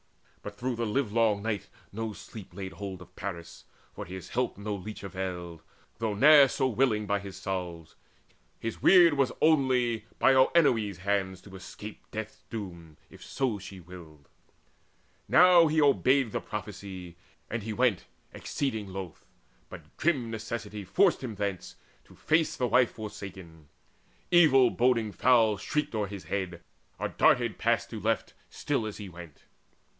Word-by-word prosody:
But 105 - -8
through 125 +2 -3
the 115 -1 -1
livelong 110 -3 +1
night 105 -3 -2 0.2
no 110 +1 -4
sleep 100 -4 -11
laid 95 -1 -6
hold 95 0 -7
On - - -18
Paris: 85 -5 -7 0.3
for - - -7
his 95 +1 -8
help 125 -4 -1
no 105 +1 -4
leech 105 +1 -7
availed, 90 -3 -5 0.4
Though 110 -2 -1
ne'er 145 +4 +8
so 130 0 0
willing, 115 -3 +1
with 100 0 0
his 100 -1 -9
salves. 90 -4 -5 0.6
His 115 - -5
weird 175 -4 +7
Was 135 -2 +1
only 130 -7 +2
by 135 - +5
Oenone's 130 - +3
hands 95 -1 -1
to 95 -2 -13
escape 105 +3 -10
Death's 110 0 -7
doom, 85 -8 -8
if - - -14
so 125 -6 -2
she 95 0 -10
willed. 80 -5 -13 1.0
Now 175 -1 +7
he 155 +1 +1
obeyed 135 -4 +3
The - - -2
prophecy, 95 -4 -7 0.3
and 115 - -3
he 110 +2 -5
went 115 -3 +1 0.3
exceeding 110 -8 -3
loth, 95 -3 -7 0.5
But - - -12
grim 135 -8 0
necessity 110 -2 -5
forced 175 - +2
him 115 -4 -5
thence, 100 -3 -4 0.3
to - - -18
face 160 0 +1
The 125 - 0
wife 125 +1 +4
forsaken. 95 -7 -9 0.6
Evil 140 -8 +6
boding 120 -3 +1
fowl 115 -3 +3
Shrieked 150 +9 -2
o'er 105 -2 -1
his 100 -1 -8
head, 90 -3 -4 0.3
or - - -3
darted - - +2
past - - +1
to - - -5
left, - - -1 0.2
Still 135 -7 -2
as 105 - -7
he 105 - -7
went. 85 -4 -12
105 Hz, 150 wpm, -28 LUFS, 95-125 Hz, 1.0 s, ne'er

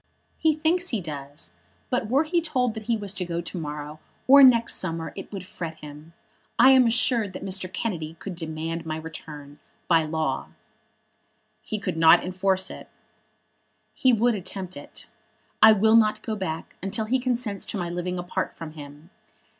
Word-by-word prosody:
"He 315 -1 +3
thinks 340 +4 +1
he 230 - -1
does; 145 -4 -6 0.4
but 250 -3 0
were 275 +5 +3
he 340 +2 0
told 255 -7 0
that 220 -1 -8
he 230 - +2
was 205 -2 -3
to 185 -2 -3
go 170 -1 -3
to 175 +2 -5
morrow, 150 0 -6 0.3
or 280 +2 +9
next 235 -3 +6
summer, 165 -3 -3
it 195 - -8
would 195 -3 -6
fret 165 -3 -7
him. 150 +1 -12 0.4
I 260 +2 +7
am 260 -2 +6
assured 230 -3 +2
that - - -7
Mr. 185 -1 -2
Kennedy 170 -6 -4
could 195 +3 -7
demand 165 0 -4
my 155 -1 -4
return, 150 -2 -9 0.3
by 165 -2 +4
law." 155 0 -2 1.1
"He 215 - -4
could 190 -5 -4
not 165 +1 +6
enforce 185 +1 0
it." - - -10 1.0
"He 260 - +3
would 235 +1 +3
attempt 190 -2 -5
it. 145 - -10 0.6
I 220 - +10
will 220 +1 +4
not 215 -1 +3
go 220 - -3
back 165 -5 -5
until 200 +4 -2
he 255 +4 +1
consents 245 -5 -1
to 215 - -3
my 175 -2 -3
living 180 +1 -3
apart 175 0 -3
from 165 -2 -8
him. 150 +2 -12
185 Hz, 175 wpm, -25 LUFS, 160-230 Hz, 1.1 s, I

